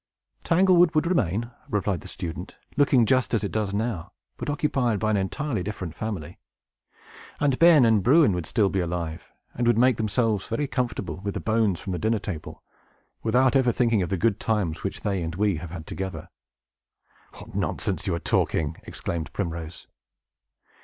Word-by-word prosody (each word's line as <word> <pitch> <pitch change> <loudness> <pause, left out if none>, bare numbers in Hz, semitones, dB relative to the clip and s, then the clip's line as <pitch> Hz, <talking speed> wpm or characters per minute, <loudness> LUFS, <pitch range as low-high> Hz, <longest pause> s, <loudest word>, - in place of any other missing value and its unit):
"Tanglewood 180 -1 +4
would 155 - +3
remain," 115 - 0 0.2
replied 100 -4 -1
the - - -10
student, 90 +2 -7 0.2
"looking 140 -4 +4
just 130 +1 +2
as 110 - 0
it 100 - -2
does 105 -3 -1
now, 100 -4 -3 0.2
but - - -5
occupied 135 -6 +1
by 110 +1 0
an 105 - +2
entirely 110 +4 -2
different 90 -4 -5
family. 90 -7 -5 1.0
And 140 -3 +1
Ben 165 -6 +7
and 110 -3 +4
Bruin 140 - +5
would 90 -2 -3
be - - -9
still 105 -5 +2
alive, 85 -2 -4 0.2
and 120 0 -1
would 120 -2 +4
make 125 -1 +4
themselves 110 -1 0
very 115 +6 -1
comfortable 125 -8 -3
with 100 +2 -4
the - - -1
bones 110 -5 +1
from 95 - -5
the 90 - -2
dinner 110 +1 +1
table, 95 -6 -7 0.6
without 125 +4 +3
ever 130 -3 +4
thinking 115 -4 +2
of 90 - -2
the 95 - 0
good 105 +2 +1
times 100 -8 -1
which - - -4
they 100 -3 -1
and 80 0 -4
we 100 -2 +1
have 85 +2 -7
had 80 -1 -7
together!" 95 +2 -5 1.0
"What - - -12
nonsense - - -2
you - - +1
are - - -3
talking!" 80 -1 0
exclaimed 85 -2 -5
Primrose. 85 -3 -5
105 Hz, 175 wpm, -25 LUFS, 90-125 Hz, 1.0 s, Ben